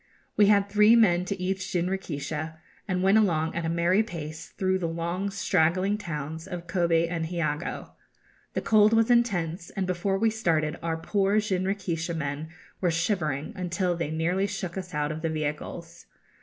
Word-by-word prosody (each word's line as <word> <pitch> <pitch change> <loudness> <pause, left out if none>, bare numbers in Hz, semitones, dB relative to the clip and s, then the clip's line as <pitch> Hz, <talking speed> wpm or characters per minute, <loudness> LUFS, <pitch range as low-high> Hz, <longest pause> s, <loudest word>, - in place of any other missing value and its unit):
We 205 - +5
had 200 -1 +4
three 210 +2 +6
men 180 -6 +4
to 195 +1 -3
each 190 +1 -2
jinrikisha, 165 -3 -3 0.3
and 185 -2 0
went 195 +3 +5
along 160 -6 +1
at 170 -1 -2
a - - 0
merry 170 +4 +3
pace 160 -6 -6
through 190 -1 -1
the 170 - -1
long 170 +4 -2
straggling 195 0 +1
towns 160 -3 -5
of 175 -1 -6
Kobe 170 -2 +2
and 165 -1 -2
Hiogo. 160 -2 -3 0.6
The - - 0
cold 215 0 +5
was 225 +1 +4
intense, 180 -8 +1
and 195 -2 -2
before 185 +2 0
we 225 +2 +2
started 160 -8 0
our 165 -1 -1
poor 200 +4 +1
jinrikisha 185 -4 -1
men 150 0 -3 0.3
were 180 - +2
shivering 165 - -1
until 180 -1 -1
they 170 -3 -2
nearly 175 +5 0
shook 190 -3 -5
us 180 -4 -6
out 150 0 0
of 155 +1 -5
the 165 - -1
vehicles. 160 +2 -5
175 Hz, 170 wpm, -27 LUFS, 165-195 Hz, 0.6 s, three